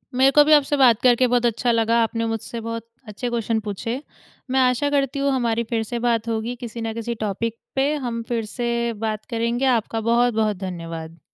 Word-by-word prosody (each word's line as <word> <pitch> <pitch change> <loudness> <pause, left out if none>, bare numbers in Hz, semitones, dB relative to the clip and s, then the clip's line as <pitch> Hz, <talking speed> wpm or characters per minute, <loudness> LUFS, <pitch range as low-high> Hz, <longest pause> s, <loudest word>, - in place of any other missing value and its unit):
मेरे 265 +2 +5
को 295 +2 +7
भी 305 +1 +4
आपसे 290 -1 +4
बात 240 -5 +5
करके 250 0 +4
बहुत 245 0 +2
अच्छा 235 +1 +1
लगा। 230 0 +2
आपने 230 0 -1
मुझसे 225 +1 -4
बहुत 230 0 -5 0.2
अच्छे 215 +4 -4
क्वेश्चन 230 -1 0
पूछे। 230 +6 -3 0.5
मैं 265 - +3
आशा 255 +2 +2
करती 280 -1 0
हूँ 280 0 +1
हमारी 235 -3 0
फिर 225 -2 0
से 235 +2 -4
बात 230 -1 +1
होगी, 230 +1 -2
किसी 235 -1 -7
न 225 0 -3
किसी 230 +1 -4
टॉपिक 220 +2 -3 0.2
पे 275 +2 +2
हम 240 -5 -3
फिर 230 -2 -1
से 235 -1 -1
बात 215 0 -4
करेंगे। 235 +2 0
आपका 225 0 -3
बहुत-बहुत 220 -4 +2
धन्यवाद। 165 -3 -6
235 Hz, 195 wpm, -22 LUFS, 225-250 Hz, 0.5 s, को